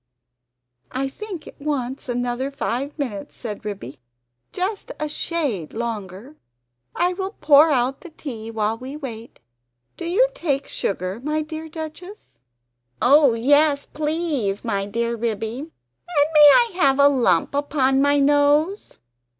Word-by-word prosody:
"I 270 +1 -2
think 380 +1 -8
it - - -13
wants 270 -3 -3
another 245 +2 -1
five 275 0 -3
minutes," 235 -9 -5
said 220 -3 -6
Ribby. 190 - -7 0.5
"Just 390 +3 -3
a 305 - -1
shade 290 - -3
longer; 225 +3 -5 0.6
I 360 +1 +1
will 380 +2 -5
pour 295 +1 +6
out 265 -1 0
the 350 - -10
tea, 240 -8 -7
while 220 -1 -1
we 265 +4 -7
wait. 235 - -8 0.6
Do - - -6
you 395 +9 +3
take 285 - -2
sugar, 190 +3 -3
my 305 +1 -1
dear 315 +1 -7
Duchess?" 315 - -9 0.6
"Oh 280 -2 +5
yes, 285 +4 +3
please! 300 - -2
my 200 -3 -1
dear 235 +3 -1
Ribby; 225 +1 -3
and 290 - -3
may 300 -1 +9
I 475 -1 +4
have 275 -6 +4
a 280 0 +7
lump 240 -12 +2
upon 275 -2 +1
my 285 +1 +3
nose?" 290 +6 +2
280 Hz, 135 wpm, -22 LUFS, 230-310 Hz, 0.6 s, may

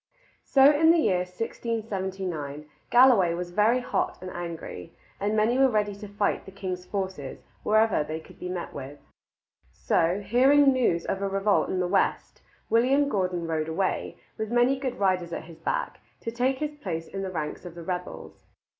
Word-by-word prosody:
So 275 +1 +6
in 320 +2 +4
the 335 - +6
year 190 - +2
1679 190 -7 -4 0.2
Galloway 240 -9 +6
was 175 0 -5
very 220 +6 +3
hot - - -1
and 185 0 -7
angry, 170 - -7 0.3
and 210 +2 0
many 230 +4 +2
were 270 0 +6
ready 210 -3 0
to 205 +1 -9
fight 205 0 -1
the 195 - -10
king's 185 -2 -5
forces 190 -9 -4 0.2
wherever 215 -6 +3
they 155 +1 -5
could - - -16
be 180 - -5
met 180 -1 -5
with. 140 +1 -8 0.7
So, 170 +4 +1
hearing 270 +7 +5
news 205 -10 +1
of 195 - -2
a 200 - 0
revolt 195 +1 +1
in 185 - -1
the 180 - +1
west, 195 +2 0 0.3
William 265 +5 +3
Gordon 180 -6 -1
rode 160 -1 -2
away, 185 +4 -2 0.2
with 220 -1 -2
many 245 +3 +3
good 260 -2 -3
riders 185 -3 0
at - - -4
his 165 -1 -13
back, - - -2 0.2
to 230 - -4
take 255 +3 0
his 300 +1 -3
place 175 - -5
in 195 - -5
the 190 - -3
ranks 155 -4 -4
of 175 -2 -9
the 170 - -8
rebels. 180 +1 -6
195 Hz, 180 wpm, -26 LUFS, 175-240 Hz, 0.7 s, So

